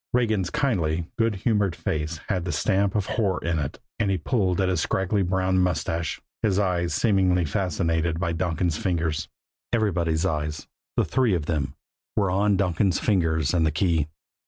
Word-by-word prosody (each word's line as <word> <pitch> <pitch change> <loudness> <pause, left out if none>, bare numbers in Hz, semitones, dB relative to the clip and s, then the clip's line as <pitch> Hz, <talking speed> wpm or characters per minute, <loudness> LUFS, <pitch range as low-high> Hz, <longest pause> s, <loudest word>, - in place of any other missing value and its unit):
Regan's 110 -6 +1
kindly, 90 - 0
good 115 -2 +1
humored 100 -3 +1
face 80 +1 -3
had 95 -5 0
the 90 - -2
stamp 100 +1 +1
of 105 -3 +1
horror 100 -5 0
in 85 -1 0
it, 70 -2 -4 0.2
and 105 -3 +1
he 95 - +2
pulled 95 0 0
at 95 - +2
his 90 -3 +1
scraggly 95 +4 0
brown 95 0 +1
mustache, 85 -2 0 0.2
his 100 -3 +2
eyes 90 -4 +1
seemingly 95 -5 +3
fascinated 80 -1 0
by 85 -2 0
Donkin's 85 -1 -1
fingers. 80 -3 -1 0.4
Everybody's 85 -8 +1
eyes, 75 0 -2 0.3
the - - +3
three 125 -7 +2
of 80 -4 -2
them, 75 -4 -2 0.4
were 100 -3 +2
on 100 +1 +2
Donkin's 90 0 +1
fingers 80 -7 +1
and 85 -2 +3
the 80 - +3
key. 80 -1 +1
90 Hz, 165 wpm, -25 LUFS, 80-100 Hz, 0.4 s, seemingly